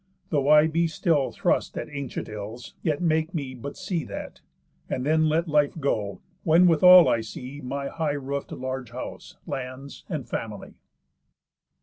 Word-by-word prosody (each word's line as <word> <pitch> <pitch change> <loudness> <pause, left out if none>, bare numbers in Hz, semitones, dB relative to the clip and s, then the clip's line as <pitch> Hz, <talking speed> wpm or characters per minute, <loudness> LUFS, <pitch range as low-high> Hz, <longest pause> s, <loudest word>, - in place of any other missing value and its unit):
Though 145 -2 +1
I 150 0 +7
be 165 +1 +1
still 160 -4 +1
thrust - - 0
at - - -3
By - - -16
ancient 140 -3 -4
ills, 110 +3 -8
yet 155 +1 -1
make 160 +1 +1
me 140 -5 -3
but 130 +3 -8
see 170 -5 -2
that. - - -8 0.5
And 130 - -2
then 155 +1 +3
let 165 +3 +1
life 150 0 +2
go, 105 -9 -1 0.2
when 170 +2 +5
withal 180 +1 +8
I 115 - +2
see 125 +5 -8
My 140 +2 -3
high 160 -1 -2
roof'd 140 0 -4
large 130 -2 -4
house, - - -8
lands, 135 0 -6
and 155 -8 -4
family." 105 -3 -5
145 Hz, 160 wpm, -26 LUFS, 130-160 Hz, 0.5 s, withal